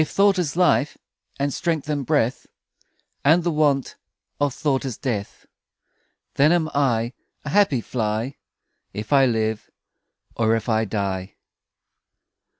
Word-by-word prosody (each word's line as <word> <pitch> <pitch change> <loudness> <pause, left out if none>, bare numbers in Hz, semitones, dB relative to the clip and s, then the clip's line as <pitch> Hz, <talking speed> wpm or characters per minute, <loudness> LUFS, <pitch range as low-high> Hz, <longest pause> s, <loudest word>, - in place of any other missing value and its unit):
If - - -6
thought 195 -1 +3
is 165 -5 -1
life 175 -5 +2 0.4
And 140 0 -1
strength 165 -4 -2
and 145 -2 -1
breath 135 -4 0 0.8
And 165 +4 +4
the 170 - 0
want 145 -4 +1 0.4
Of 145 -1 +1
thought 140 -3 0
is 130 -5 -4
death; 110 -7 -4 0.9
Then 145 +3 +4
am 165 -3 +1
I 120 -4 +1 0.3
A - - -3
happy 150 - +3
fly, 115 +3 -2 0.6
If 105 +7 -4
I 135 -1 +6
live, 110 -2 -1 0.7
Or 115 -1 +2
if 115 0 -3
I 110 -1 +2
die. 95 -2 -3
135 Hz, 135 wpm, -23 LUFS, 110-150 Hz, 0.9 s, I